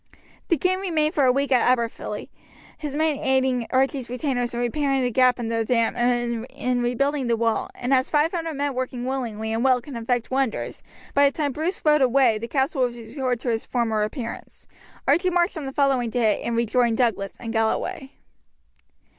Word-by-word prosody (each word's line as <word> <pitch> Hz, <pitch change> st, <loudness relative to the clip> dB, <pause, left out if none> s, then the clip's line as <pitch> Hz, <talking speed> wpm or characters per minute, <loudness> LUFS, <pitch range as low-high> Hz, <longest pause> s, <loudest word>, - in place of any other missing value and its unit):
The 335 Hz, -, +2 dB
king 370 Hz, +5 st, +1 dB
remained 320 Hz, -5 st, 0 dB
a 265 Hz, -4 st, +4 dB
week 275 Hz, +1 st, -1 dB
at 250 Hz, -2 st, +5 dB, 0.2 s
Aberfilly, 235 Hz, -1 st, -5 dB, 0.5 s
his 295 Hz, -3 st, -6 dB
men 310 Hz, -2 st, +1 dB
aiding 260 Hz, -2 st, +1 dB
Archie's 265 Hz, -1 st, 0 dB
retainers 245 Hz, -1 st, -1 dB
in 240 Hz, -, -4 dB
repairing 270 Hz, +2 st, 0 dB
the 245 Hz, -, 0 dB
gap 255 Hz, +1 st, +4 dB
in 235 Hz, -2 st, -3 dB
the 230 Hz, 0 st, 0 dB
dam 230 Hz, 0 st, +1 dB
and 240 Hz, -1 st, 0 dB
in 250 Hz, -2 st, -1 dB
rebuilding 265 Hz, +3 st, 0 dB
the 235 Hz, -1 st, +1 dB
wall; 230 Hz, 0 st, 0 dB
and 250 Hz, +2 st, -1 dB
as 260 Hz, +1 st, +2 dB
five 300 Hz, +2 st, +2 dB
hundred 330 Hz, -3 st, -3 dB
men 285 Hz, 0 st, -1 dB
working 255 Hz, -1 st, -3 dB
willingly 225 Hz, -4 st, -3 dB
and 225 Hz, +2 st, 0 dB
well 260 Hz, -2 st, +4 dB
can 260 Hz, +2 st, -10 dB
effect 235 Hz, +1 st, -2 dB
wonders, 265 Hz, -3 st, -1 dB, 0.3 s
by 280 Hz, 0 st, +5 dB
the -, -, -11 dB
time 295 Hz, -3 st, 0 dB
Bruce 320 Hz, +7 st, -3 dB
rode 300 Hz, -1 st, +5 dB
away 250 Hz, -3 st, +4 dB
the 230 Hz, -, -5 dB
castle 270 Hz, +1 st, 0 dB
was 245 Hz, -1 st, +1 dB
restored 250 Hz, +1 st, -3 dB
to 245 Hz, -, -1 dB
its 225 Hz, -1 st, -1 dB
former 225 Hz, -3 st, 0 dB
appearance. 230 Hz, +2 st, -6 dB, 0.4 s
Archie 345 Hz, +7 st, +3 dB
marched 350 Hz, +1 st, +1 dB
on 300 Hz, -4 st, -5 dB
the -, -, -4 dB
following 270 Hz, -4 st, +1 dB
day, 220 Hz, -3 st, +1 dB
and 235 Hz, -, -2 dB
rejoined 235 Hz, 0 st, +2 dB
Douglas 215 Hz, -6 st, 0 dB
in 230 Hz, -2 st, -5 dB
Galloway. 265 Hz, +7 st, -1 dB
255 Hz, 190 wpm, -24 LUFS, 235-280 Hz, 0.5 s, at